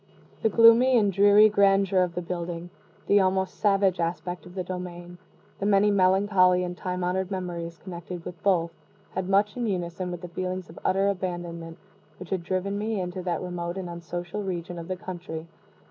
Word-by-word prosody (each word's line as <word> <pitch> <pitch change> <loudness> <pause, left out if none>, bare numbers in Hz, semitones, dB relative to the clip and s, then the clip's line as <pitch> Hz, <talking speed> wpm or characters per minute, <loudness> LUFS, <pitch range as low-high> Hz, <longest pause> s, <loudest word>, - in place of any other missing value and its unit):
The 220 - +3
gloomy 230 +3 +6
and 205 -3 +2
dreary 205 +2 +7
grandeur 195 -2 +3
of 175 -2 -1
the 180 - -3
building, 170 0 -5 0.3
the 205 - +5
almost 190 0 0
savage 195 -3 +2
aspect 175 +1 -3
of 180 - -13
the 185 - -2
domain, 175 -1 -7 0.4
the 200 - -1
many 205 0 +4
melancholy 185 -1 +4
and 180 0 -4
time 180 +1 -3
honored 185 +1 -1
memories 175 -3 -4
connected 175 -1 -8
with 170 -2 -8
both, 170 -4 +2 0.4
had 190 0 -3
much 200 +2 +3
in 240 -2 -2
unison 180 -2 -3
with 175 -1 -6
the 180 - -6
feelings 185 0 -4
of 165 - -12
utter 195 +1 +2
abandonment 175 -3 -4 0.4
which 185 - -10
had 190 -2 0
driven 190 +3 -2
me 215 0 -1
into 180 0 -4
that 175 -1 -2
remote 175 0 -4
and 185 -2 -4
unsocial 175 +3 -5
region 175 -2 -4
of 165 - -8
the 185 - -2
country. 175 -3 -7
185 Hz, 180 wpm, -26 LUFS, 175-195 Hz, 0.4 s, dreary